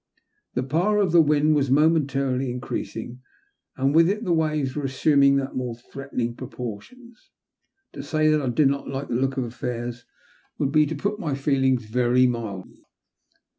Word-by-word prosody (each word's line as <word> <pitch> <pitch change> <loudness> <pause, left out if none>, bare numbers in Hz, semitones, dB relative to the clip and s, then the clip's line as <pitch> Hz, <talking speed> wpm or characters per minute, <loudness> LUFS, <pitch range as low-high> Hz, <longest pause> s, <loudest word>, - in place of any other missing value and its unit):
The 125 - 0
power 170 +10 +1
of 200 -5 +2
the 170 0 +6
wind 150 0 +3
was 140 -3 +1
momentarily 140 -3 +2
increasing, 125 0 -5 0.6
and 135 +2 +1
with 165 +2 +5
it 210 +3 -2
the 180 - +1
waves 155 -4 0
were 150 - -2
assuming 140 +1 +3 0.2
more 125 -2 -3
threatening 120 -1 -5
proportions. 130 - -9 0.6
To 140 - -6
say 155 +2 0
that 155 -1 +3
I 130 - -1
did 135 +4 +3
not 140 +1 -1
like 135 +1 -5
the - - -2
look 135 +3 0
of 130 - 0
affairs 120 0 -5 0.5
would 140 - -1
be 150 0 +4
to 160 - -4
put 200 +8 -2
my 150 -9 -2
feelings 135 -3 +1
very 125 +3 +2
mildly. 110 -6 -4
135 Hz, 165 wpm, -24 LUFS, 125-155 Hz, 0.6 s, the